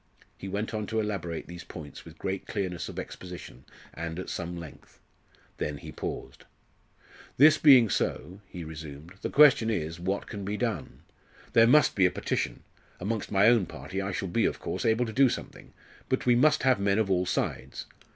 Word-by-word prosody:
He 95 - -8
went 105 +3 -3
on 105 -1 -3
to 110 0 -1
elaborate 95 -6 -3
these 85 0 -9
points 75 -4 -10
with - - -13
great 95 0 -4
clearness 90 -3 -3
of - - -9
exposition 90 -8 -8 0.3
and 85 0 -5
at 95 - -5
some 85 0 -4
length; 85 -3 -12 0.6
then 75 -1 -2
he - - -9
paused. - - -6 0.9
"This 155 +3 +7
being 130 -6 +8
so," 95 0 -2
he 90 -2 -8
resumed, 80 0 -9
"the - - -2
question 140 -6 +6
is, 80 -5 -2
what 95 +3 -2
can 100 -2 -7
be 100 +2 -3
done? 115 -9 -3 0.5
There 115 0 +6
must 150 +5 +5
be 95 -2 +5
a - - +1
petition. - - -3 0.4
Amongst 105 +3 -3
my 100 0 +4
own 115 -5 +5
party 95 +1 -5
I 100 +1 -3
shall 95 - -3
be, 110 +6 +1
of - - 0
course, - - -4
able 115 +2 +2
to 110 - -6
do 135 +1 +5
something, - - -7 0.4
but 130 - 0
we 125 - +5
must 150 +4 +4
have 130 -4 +4
men 100 0 +2
of 110 -3 +1
all 90 -1 +1
sides. 65 - -3
100 Hz, 190 wpm, -28 LUFS, 85-115 Hz, 0.9 s, being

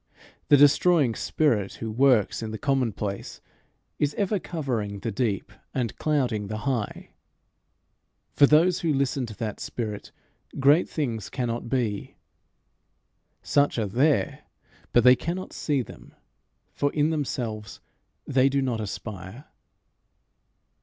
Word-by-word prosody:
The 145 - +7
destroying 145 -1 +5
spirit, 110 -5 0
who 110 -1 -5
works 125 -3 +3
in 110 - -4
the 110 - -5
commonplace, 115 -7 -2 0.6
is 145 0 0
ever 205 0 0
covering 120 - -3
the 115 - -2
deep 105 -2 -2 0.2
and 120 -5 -1
clouding 125 -9 0
the 110 +1 -5
high. 125 -6 -3 1.2
For 140 - +6
those 165 +5 +4
who 160 -4 0
listen 135 -2 0
to 110 - -9
that 110 -3 -4
spirit 105 -4 -5 0.5
great 145 +5 +4
things 115 - -3
cannot 120 -2 -3
be. 115 -6 -2 1.3
Such 145 -2 +2
are 110 - +1
there, 135 +9 +1 0.5
but 120 - +4
they 125 +1 +8
cannot 170 +8 -5
see 140 -4 0
them, - - -14 0.6
for 145 0 0
in 150 +1 +2
themselves 115 -9 -3 0.5
they 130 +1 +3
do 140 +1 +1
not 125 -5 -1
aspire. 105 - -7
125 Hz, 125 wpm, -26 LUFS, 110-145 Hz, 1.3 s, they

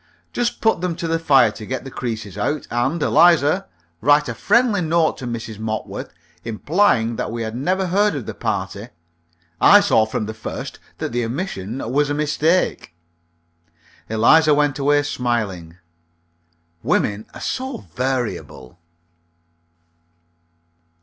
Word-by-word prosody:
Just 240 -1 -1
put 220 -6 +2
them 180 -2 -1
to 170 -1 -4
the 165 0 0
fire 135 -8 +4
to 110 - -10
get 130 +5 -4
the 135 - -9
creases 110 -6 -5
out. 145 +8 -2
And, 130 +8 0
Eliza, 170 +1 +4 0.3
write 145 +4 +4
a 115 - -3
friendly 210 - +2
note 165 -1 +1
to 130 - -6
Mrs. 115 -2 -6
Mopworth, 110 0 -4 0.3
implying 115 - +1
that - - -2
we 115 0 -3
had 110 0 -5
never 185 +9 0
heard 200 +1 +2
of 135 -6 -5
the 110 - -5
party. 100 +2 -3 0.7
I 205 - +8
saw 115 - +3
from 110 0 -3
the 110 - -5
first 110 - -7 0.2
that - - -4
the 120 +1 -1
omission 115 - -4
was 145 +2 +2
a 145 - -1
mistake." 150 - 0 1.1
Eliza 150 +8 +5
went 145 -1 +1
away 145 +1 +3
smiling. 110 - -3 1.0
Women 105 +1 0
are - - -8
so 260 - -4
variable. 120 - -3
135 Hz, 135 wpm, -21 LUFS, 110-165 Hz, 1.1 s, I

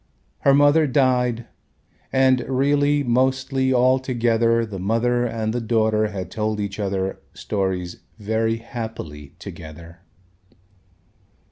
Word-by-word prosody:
Her 140 -1 +4
mother 145 +2 +4
died 125 -3 +1 0.7
and 130 -1 +4
really 145 +2 +2
mostly 130 +1 +1
altogether 120 -3 +2
the 100 -4 -7
mother 120 +5 +1
and 110 -1 -2
the 120 - -2
daughter 110 -1 +1
had 95 -4 -6
told 110 0 -2
each 100 0 -4
other 95 -1 -2 0.2
stories 95 -3 -3 0.2
very 110 +1 -1
happily 110 - -8
together. 85 +2 -11
115 Hz, 105 wpm, -22 LUFS, 105-130 Hz, 0.7 s, Her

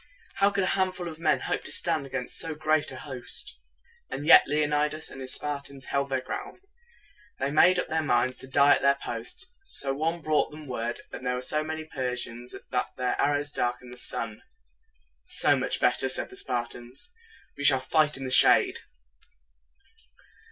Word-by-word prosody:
How 200 0 +4
could 200 -1 -1
a 185 - +1
handful 185 -2 -1
of 160 -1 -8
men 165 - +1
hope - - -2
to - - -2
stand 160 -5 +1
against 135 -2 -3
so 160 -1 -1
great 155 0 +1
a - - -8
host? 130 -2 -2 0.5
And 145 - -5
yet 165 - +8
Le 150 +2 +1
on 150 0 -2
i 150 0 +2
das 155 +1 -5
and 135 - -9
his 130 0 -4
Spartans 140 -2 -5
held 140 0 -1
their 130 -1 -1
ground. 395 - -7 0.8
They 130 - -2
had 140 - -2
made 180 +4 +5
up 180 - -1
their 160 0 -1
minds 130 -3 +1
to 130 - -7
die 140 +2 +5
at - - 0
their 140 0 +3
post. 125 - -5
Some 140 - -1
one 165 +2 -1
brought 155 -1 +1
them 155 0 -11
word 120 -2 -4
that - - -8
there 125 0 -1
were 125 - -4
so 150 +4 -1
many 160 0 -5
Persians 125 -5 -4 0.2
that 125 -1 0
their 125 -1 -1
arrows 145 0 0
dark 120 -3 -1
ened 125 - -12
the 125 - -11
sun. 110 -2 -1 0.8
"So - - +3
much - - -1
the - - 0
better," - - +3
said - - +4
the - - -11
Spartans; 120 - -4 0.4
"we 145 - -7
shall 135 -2 +6
fight 150 +2 +2
in 135 - -6
the 130 - -3
shade." - - +6
145 Hz, 200 wpm, -27 LUFS, 130-155 Hz, 0.8 s, yet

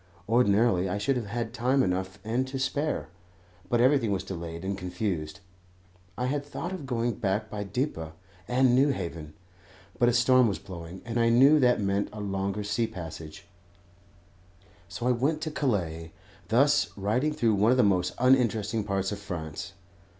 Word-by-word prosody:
Ordinarily 105 -4 +3
I 100 - -1
should 105 +7 0
have 120 -4 -3
had 115 +1 -4
time 130 +2 +2
enough 95 +1 -2
and 120 +4 -1
to 135 +1 -4
spare, 145 +3 -1 0.6
but 120 - +2
everything 125 -3 +3
was 95 -2 -1
delayed 85 -2 -6
and 100 +1 -1
confused. 90 -3 -4 0.8
I 125 - -1
had 140 +2 -1
thought 165 +5 -6
of 175 -8 -6
going 120 -1 0
back 105 0 -1
by 105 - -4
Dieppe 105 - -2 0.4
and 125 0 +3
Newhaven; 85 - -1 0.6
but 120 -1 +5
a - - +1
storm 125 +1 +5
was 100 - -1
blowing, 90 -2 -9
and 120 0 -2
I 115 0 +4
knew 135 +6 +6
that 125 -2 +4
meant 100 0 0
a 105 - -8
longer 100 0 -2
sea 105 +3 0
passage, 80 -4 -9 1.4
so 120 - -5
I - - +4
went 140 +6 +1
to 155 -1 -3
Calais, 85 - -2 0.4
thus 140 +5 +3
riding 110 +10 0
through 115 -6 +1
one 105 +2 +3
of 130 - +4
the 125 - +5
most 90 -3 +1
uninteresting 115 -4 +2
parts 100 -1 -1
of 100 - -4
France. 85 -3 -6
110 Hz, 165 wpm, -28 LUFS, 95-125 Hz, 1.4 s, knew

